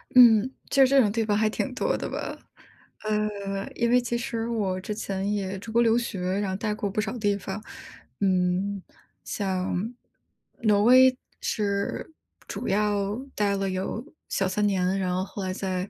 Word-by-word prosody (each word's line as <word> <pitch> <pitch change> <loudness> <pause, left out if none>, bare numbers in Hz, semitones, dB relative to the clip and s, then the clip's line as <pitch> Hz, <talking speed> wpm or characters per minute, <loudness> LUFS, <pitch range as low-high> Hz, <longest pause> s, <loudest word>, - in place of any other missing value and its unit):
嗯， 240 -1 +7 0.2
就 275 -1 +6
这 275 +1 +5
种 225 -5 +4
地 225 +1 0
方 210 -1 +1
还 215 0 +3
挺 255 +4 -2
多 260 - 0
的 - - -4
吧。 - - -4 0.7
呃， 205 -2 -2
因 235 0 +1
为 250 - +5
其 240 0 -1
实 235 -2 -3
我 200 -5 -1
之 210 - -4
前 200 -1 -2
也 195 -1 -2
出 220 +3 -8
国 235 - +4
留 230 -1 +4
学， 235 -5 -3 0.2
然 205 -2 -1
后 190 - -2
呆 210 +1 -1
过 210 -1 -2
不 200 - -2
少 215 +3 -2
地 205 -3 +1
方。 195 +2 -5 0.6
嗯， 190 +1 +1 0.4
像 190 -3 -2 0.9
挪 205 -2 +4
威 255 +2 +7 0.2
是 200 +5 -2 0.4
主 - - -5
要 205 0 +1 0.2
待 205 -1 +1
了 195 0 -1
有 190 +5 -3 0.3
小 195 - +1
3 205 +2 +1
年， 190 -1 +1
然 180 -1 0
后 185 - 0
后 195 +1 -6
来 185 0 -2
在 185 0 -3
205 Hz, 185 characters per minute, -26 LUFS, 195-225 Hz, 0.9 s, 嗯